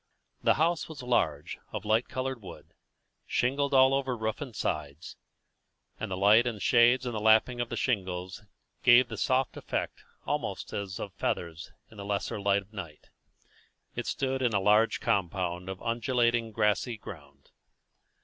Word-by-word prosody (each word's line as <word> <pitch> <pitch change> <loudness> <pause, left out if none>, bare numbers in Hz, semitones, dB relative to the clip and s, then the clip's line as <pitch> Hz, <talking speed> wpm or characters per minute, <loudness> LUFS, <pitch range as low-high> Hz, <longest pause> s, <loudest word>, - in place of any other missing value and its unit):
The - - +3
house 165 +3 0
was 145 -5 -8
large, 80 - 0
of 110 -1 -5
light 110 +3 +1
coloured 130 -1 -3
wood, 95 - -12 0.5
shingled 140 +3 0
all 130 0 +6
over 135 -2 -1
roof 110 +2 -3
and 130 -6 -7
sides, 75 -2 -4 0.8
and 110 - -4
the 95 - -3
light 105 +5 +5
and 115 -3 -3
shades 120 +4 +4
in 125 - -2
the 110 - -3
lapping 110 +3 +4
of 120 - -3
the - - -4
shingles 95 -6 -2 0.4
gave 125 0 +6
the - - -5
soft 130 -1 0
effect - - -4 0.2
almost - - -3
as 100 -2 -4
of 100 - -6
feathers 85 -4 -3 0.2
in 110 - -15
the 100 - -6
lesser 100 0 -2
light 100 0 +2
of 100 +3 -27
night. 85 -7 -9 0.8
It - - -4
stood 135 0 -1
in 120 -3 +1
a - - +4
large 105 +3 +3
compound 90 -1 -1
of 95 -1 -5
undulating 115 -1 +1
grassy 105 +2 0
ground. 70 -8 -12
110 Hz, 160 wpm, -29 LUFS, 95-125 Hz, 0.8 s, all